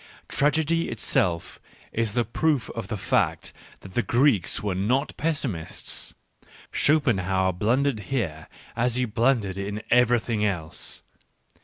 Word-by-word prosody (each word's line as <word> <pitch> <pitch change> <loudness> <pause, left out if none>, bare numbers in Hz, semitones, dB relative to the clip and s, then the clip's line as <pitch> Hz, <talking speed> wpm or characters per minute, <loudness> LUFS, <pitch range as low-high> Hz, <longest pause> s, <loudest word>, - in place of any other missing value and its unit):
Tragedy 160 +3 +1
itself 90 -6 0 0.3
is 110 -2 0
the 120 0 +1
proof 140 +3 0
of 115 - -5
the 110 - -3
fact - - 0 0.3
that 95 - -12
the 120 - +2
Greeks 120 - +2
were 100 -2 0
not 120 +10 0
pessimist 140 - -2
s: - - -1 0.6
Schopen 145 -7 +3
foanerhlijnHerefi 95 +8 +1
hereas 115 - -3
he 125 0 +1
blundered 110 -4 +1
in 105 +2 -4
everything 120 -3 +3
else. 85 -7 -3
115 Hz, 120 wpm, -25 LUFS, 100-135 Hz, 0.6 s, Schopen